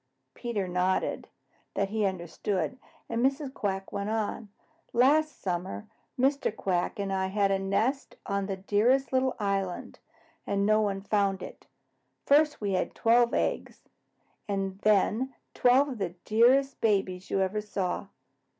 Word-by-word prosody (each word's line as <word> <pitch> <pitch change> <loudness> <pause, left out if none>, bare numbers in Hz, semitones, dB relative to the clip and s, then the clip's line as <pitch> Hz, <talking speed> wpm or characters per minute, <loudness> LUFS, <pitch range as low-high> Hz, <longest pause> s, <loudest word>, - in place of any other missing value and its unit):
Peter 215 -6 -3
nodded 180 +1 0 0.5
that 200 0 0
he 215 -1 +1
understood, 185 +4 -3 0.3
and 230 +1 -1
Mrs. 275 0 0
Quack 195 -4 -3
went 200 +1 -2
on. 220 0 -2 0.4
"Last 295 +4 +3
summer 175 - -3 0.3
Mr. 275 0 +2
Quack 180 -4 -1
and 200 -1 -2
I 190 0 0
had 200 0 +1
our 195 - +2
nest 220 +8 -1
on 200 -3 -1
the 195 -2 -3
dearest 230 +7 +2
little 260 0 +2
island, 195 -3 -2 0.5
and 200 0 +1
no 215 +1 +4
one 200 -2 -1
found 200 -1 0
it. - - -11 0.6
First 300 +1 +4
we 205 -2 -2
had 185 - -1
twelve 235 +1 +3
eggs, - - -2 0.6
and 195 -1 -2
then 215 +5 +2 0.2
twelve 255 +3 +4
of 260 -4 -5
the 180 -3 -3
dearest 255 +5 +3
babies 190 -4 0
you - - 0
ever 195 +3 0
saw." 195 -2 -3
205 Hz, 140 wpm, -28 LUFS, 195-245 Hz, 0.6 s, no